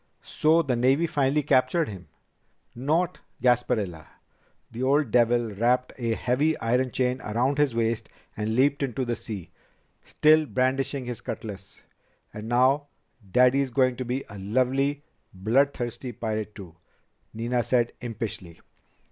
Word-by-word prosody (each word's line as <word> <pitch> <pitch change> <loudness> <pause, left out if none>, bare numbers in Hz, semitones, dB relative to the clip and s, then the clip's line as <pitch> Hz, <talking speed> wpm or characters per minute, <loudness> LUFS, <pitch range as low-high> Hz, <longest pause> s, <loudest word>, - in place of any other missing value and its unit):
"So 160 +2 +2
the 130 -5 0
Navy 135 +7 +3
finally 145 -2 +1
captured 140 +4 +2
him?" 95 -4 -9 0.7
"Not 160 +8 0 0.2
Gasparilla! 115 -9 0 0.6
The 115 +2 -6
old 135 -1 +2
devil 120 -1 +3
wrapped 120 +5 +1
a 115 -2 0
heavy 140 +8 +1
iron 125 +3 +1
chain 125 +1 -1
around 125 +6 0
his 145 -5 +2
waist 115 -1 -1 0.3
and 110 +1 -2
leaped 140 +3 +2
into 130 -1 -1
the 120 0 -1
sea, 105 -8 -8 0.5
still 155 0 +4
brandishing 135 +1 0
his 120 -1 -6
cutlass." 100 -3 -8 0.5
"And 105 +1 -7
now 130 +4 +3 0.4
Daddy 125 +3 +5
is 135 - -1
going 130 0 +2
to 130 - -3
be 125 +2 -3
a 100 -1 -10
lovely, 130 +7 0 0.3
bloodthirsty 120 +3 0
pirate 110 -2 -4
too," 90 -5 -11 0.5
Nina 120 +2 -1
said 120 0 +1
impishly. 110 -7 -6
125 Hz, 135 wpm, -26 LUFS, 115-135 Hz, 0.7 s, Daddy